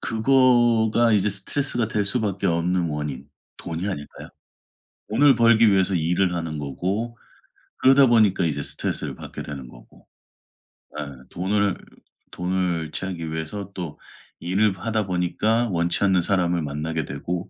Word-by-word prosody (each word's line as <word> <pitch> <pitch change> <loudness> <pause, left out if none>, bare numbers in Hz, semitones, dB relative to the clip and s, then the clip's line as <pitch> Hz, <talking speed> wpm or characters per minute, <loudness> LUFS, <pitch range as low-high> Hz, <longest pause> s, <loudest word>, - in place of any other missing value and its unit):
그거가 120 -2 +3
이제 105 0 +3
스트레스가 120 +2 -2
될 105 -2 0
수밖에 100 -3 -1
없는 85 0 +1
원인 75 -2 -5 0.3
돈이 85 +3 -5
아닐까요? 75 -7 -7 0.8
돈을 135 +4 +5
벌기 115 -2 +5
위해서 95 -1 +2
일을 90 +2 +1
하는 80 -3 -4
거고 95 - -3 0.6
그러다 135 +1 +6
보니까 105 -6 +3
이제 80 - -1
스트레스를 - - -4
받게 - - -8
되는 70 -3 -7
거고 - - -18 0.9
예. 75 - -3 0.2
돈을 100 +2 0 0.5
돈을 90 -3 -2
취하기 85 -4 -5
위해서 90 +5 -5
또 85 -5 -6 0.4
일을 95 +2 +1
하다 110 0 -1
보니까 95 +6 0
원치 85 +1 0
않는 95 -3 +3
사람을 90 -2 +1
만나게 75 +1 -3
되고 90 0 -5
95 Hz, 300 characters per minute, -23 LUFS, 85-110 Hz, 0.9 s, 그러다